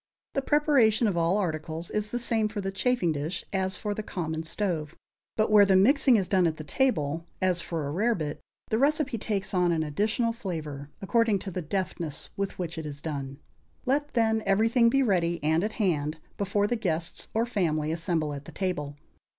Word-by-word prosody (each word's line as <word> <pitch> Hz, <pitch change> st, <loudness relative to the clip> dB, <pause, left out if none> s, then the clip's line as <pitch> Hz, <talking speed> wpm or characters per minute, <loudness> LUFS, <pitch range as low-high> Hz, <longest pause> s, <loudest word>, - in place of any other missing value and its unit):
The 275 Hz, -, 0 dB
preparation 270 Hz, -6 st, +3 dB
of 200 Hz, -, 0 dB
all 170 Hz, +3 st, +2 dB
articles 160 Hz, -3 st, -3 dB
is 210 Hz, 0 st, -1 dB
the 240 Hz, -, -2 dB
same 230 Hz, -2 st, +1 dB
for 210 Hz, 0 st, -5 dB
the 195 Hz, -1 st, -2 dB
chafing 195 Hz, -1 st, +1 dB
dish 155 Hz, +4 st, -3 dB
as 190 Hz, 0 st, -1 dB
for 210 Hz, -1 st, -2 dB
the 215 Hz, -, -4 dB
common 160 Hz, -6 st, -3 dB
stove; 165 Hz, -2 st, -2 dB, 0.4 s
but 215 Hz, -1 st, +2 dB
where 210 Hz, -1 st, +8 dB
the 195 Hz, -1 st, +4 dB
mixing 260 Hz, +6 st, +5 dB
is 190 Hz, -3 st, 0 dB
done 185 Hz, -3 st, +3 dB
at 160 Hz, -1 st, -2 dB
the 155 Hz, -, -6 dB
table, 165 Hz, -, 0 dB
as 180 Hz, -2 st, +1 dB
for 165 Hz, -4 st, -3 dB
a -, -, -3 dB
rarebit, 175 Hz, -5 st, 0 dB, 0.3 s
the 220 Hz, -, +1 dB
recipe 285 Hz, -3 st, +1 dB
takes 200 Hz, -3 st, -2 dB
on 180 Hz, -2 st, +3 dB
an 160 Hz, -2 st, +1 dB
additional 215 Hz, +9 st, 0 dB
flavor, 155 Hz, -9 st, -5 dB
according 230 Hz, 0 st, +3 dB
to 195 Hz, +1 st, -6 dB
the 180 Hz, -, -3 dB
deftness 170 Hz, -3 st, -3 dB
with 200 Hz, -1 st, -3 dB
which 170 Hz, -2 st, -4 dB
it 160 Hz, -, -6 dB
is 145 Hz, -1 st, -7 dB
done. 140 Hz, -3 st, -5 dB, 0.5 s
Let, 290 Hz, +2 st, 0 dB
then, 220 Hz, -1 st, +3 dB
everything 225 Hz, +4 st, +4 dB
be 275 Hz, +3 st, +3 dB
ready 175 Hz, -6 st, +1 dB
and 160 Hz, +3 st, +2 dB
at 215 Hz, +1 st, -2 dB
hand, 160 Hz, -7 st, 0 dB, 0.2 s
before 200 Hz, +1 st, 0 dB
the 240 Hz, -, 0 dB
guests 170 Hz, -7 st, -2 dB
or 225 Hz, +1 st, +2 dB
family 160 Hz, -9 st, 0 dB
assemble 165 Hz, -2 st, -1 dB
at 140 Hz, 0 st, -7 dB
the -, -, -10 dB
table. 150 Hz, -7 st, -3 dB
190 Hz, 195 wpm, -28 LUFS, 160-220 Hz, 0.5 s, where